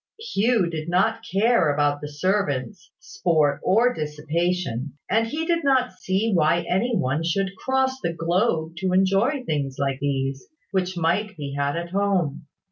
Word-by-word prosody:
Hugh 235 Hz, -, +1 dB
did 160 Hz, -1 st, -5 dB
not 190 Hz, +6 st, +1 dB
care 195 Hz, -4 st, +3 dB
about 145 Hz, 0 st, +1 dB
the 150 Hz, -, -5 dB
servants, 150 Hz, 0 st, -2 dB
sport, 165 Hz, -, 0 dB
or 235 Hz, +6 st, +3 dB
dissipation; 150 Hz, -, -2 dB
and 225 Hz, +1 st, +2 dB
he 310 Hz, +6 st, -3 dB
did 335 Hz, -1 st, +1 dB
not 260 Hz, -3 st, +2 dB
see 190 Hz, +4 st, -1 dB
why 170 Hz, 0 st, +2 dB
any 230 Hz, +7 st, +1 dB
one 135 Hz, +5 st, 0 dB
should 195 Hz, +3 st, -1 dB
cross 265 Hz, +3 st, 0 dB
the 170 Hz, -, -1 dB
globe 165 Hz, -1 st, 0 dB
to 185 Hz, +1 st, -1 dB
enjoy 195 Hz, +9 st, +2 dB
things 145 Hz, -, -2 dB
like 135 Hz, -1 st, -1 dB
these, 135 Hz, -1 st, -2 dB, 0.2 s
which 185 Hz, -2 st, -1 dB
might 185 Hz, +5 st, 0 dB
be 140 Hz, -2 st, -5 dB
had 140 Hz, +1 st, 0 dB
at 170 Hz, 0 st, -5 dB
home. 190 Hz, -7 st, 0 dB
180 Hz, 155 wpm, -24 LUFS, 150-215 Hz, 0.2 s, care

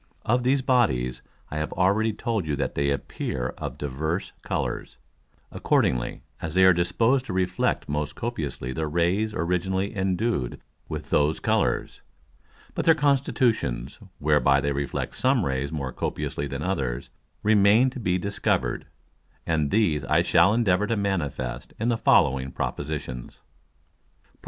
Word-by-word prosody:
Of 120 Hz, +3 st, +2 dB
these 130 Hz, +2 st, +2 dB
Bodies 65 Hz, -, +1 dB, 0.3 s
I 75 Hz, -, -3 dB
have 75 Hz, 0 st, -2 dB
already 100 Hz, +5 st, +2 dB
told 110 Hz, -4 st, -2 dB
you 75 Hz, -, 0 dB
that 70 Hz, -, -2 dB
they 70 Hz, 0 st, 0 dB
appear 65 Hz, -2 st, -3 dB
of -, -, -5 dB
divers 80 Hz, +6 st, -3 dB
Colours, -, -, -3 dB, 0.5 s
accordingly -, -, 0 dB, 0.2 s
as 80 Hz, +1 st, -4 dB
they 95 Hz, -, +5 dB
are 95 Hz, 0 st, +8 dB
disposed 115 Hz, +10 st, +2 dB
to -, -, -3 dB
reflect 90 Hz, -1 st, 0 dB
most 75 Hz, 0 st, -2 dB
copiously 80 Hz, -, -4 dB
the 80 Hz, +4 st, -2 dB
Rays 90 Hz, +7 st, +1 dB
originally 95 Hz, +4 st, -1 dB
endued 95 Hz, -, -1 dB, 0.3 s
with -, -, -6 dB
those 75 Hz, +2 st, +2 dB
Colours. -, -, 0 dB, 0.7 s
But -, -, -2 dB
their 165 Hz, -, +6 dB
Constitutions, 130 Hz, -, +1 dB, 0.2 s
whereby 75 Hz, -2 st, +3 dB
they 70 Hz, +1 st, 0 dB
reflect 70 Hz, 0 st, -3 dB
some 130 Hz, -6 st, +2 dB
Rays 65 Hz, +1 st, -2 dB
more 70 Hz, -4 st, -3 dB
copiously 70 Hz, -, -3 dB
than 70 Hz, +2 st, -4 dB
others, 65 Hz, -10 st, -2 dB, 0.3 s
remain 105 Hz, +4 st, +5 dB
to 130 Hz, -, -7 dB
be 90 Hz, -5 st, +1 dB
discover'd; 100 Hz, +3 st, -1 dB, 0.6 s
and 75 Hz, -3 st, +1 dB
these 85 Hz, -9 st, +2 dB
I 65 Hz, -, +3 dB
shall 85 Hz, +4 st, +5 dB
endeavour 105 Hz, -3 st, +2 dB
to 115 Hz, -, 0 dB
manifest 70 Hz, -11 st, -2 dB
in 115 Hz, +2 st, 0 dB
the 120 Hz, -, +2 dB
following 65 Hz, 0 st, +3 dB
Propositions. 70 Hz, -5 st, -4 dB, 0.9 s
PROP. -, -, -33 dB
85 Hz, 140 wpm, -25 LUFS, 70-105 Hz, 0.9 s, are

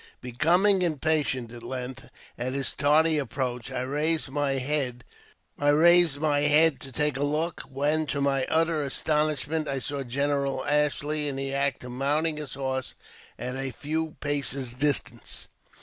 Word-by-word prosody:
Becom'ng 175 Hz, -, +3 dB
impatient,, 150 Hz, -7 st, 0 dB
at 120 Hz, -1 st, -9 dB
length, 125 Hz, +1 st, -6 dB, 0.3 s
at 125 Hz, +2 st, -3 dB
his 140 Hz, -1 st, -1 dB
tardy 155 Hz, +2 st, +3 dB
approach 125 Hz, -2 st, -3 dB
I 125 Hz, -, -2 dB
raised 150 Hz, +4 st, 0 dB
my 145 Hz, 0 st, 0 dB
head 130 Hz, -3 st, -1 dB, 0.6 s
to 150 Hz, -2 st, +4 dB
take 150 Hz, +2 st, +1 dB
a 140 Hz, -, -1 dB
look, 155 Hz, +3 st, -1 dB
when, 150 Hz, +3 st, 0 dB
to 140 Hz, 0 st, -2 dB
my 135 Hz, -2 st, +1 dB
utter 165 Hz, -1 st, +2 dB
astonishment, 150 Hz, +2 st, 0 dB
I 135 Hz, -1 st, -1 dB
saw 140 Hz, +2 st, -3 dB
General 140 Hz, +1 st, -1 dB
Ashley 150 Hz, +1 st, +1 dB
In 140 Hz, -, -1 dB
the 135 Hz, 0 st, -2 dB
act 140 Hz, -2 st, 0 dB
of 125 Hz, -, -7 dB
mounting 150 Hz, +5 st, 0 dB
his 150 Hz, -4 st, -6 dB
horse 130 Hz, -1 st, -3 dB, 0.4 s
at 125 Hz, +1 st, -4 dB
a 135 Hz, 0 st, -2 dB
few 155 Hz, +5 st, -3 dB
paces' 140 Hz, -3 st, -1 dB
distance. 140 Hz, +2 st, -1 dB
145 Hz, 140 wpm, -27 LUFS, 130-155 Hz, 0.6 s, to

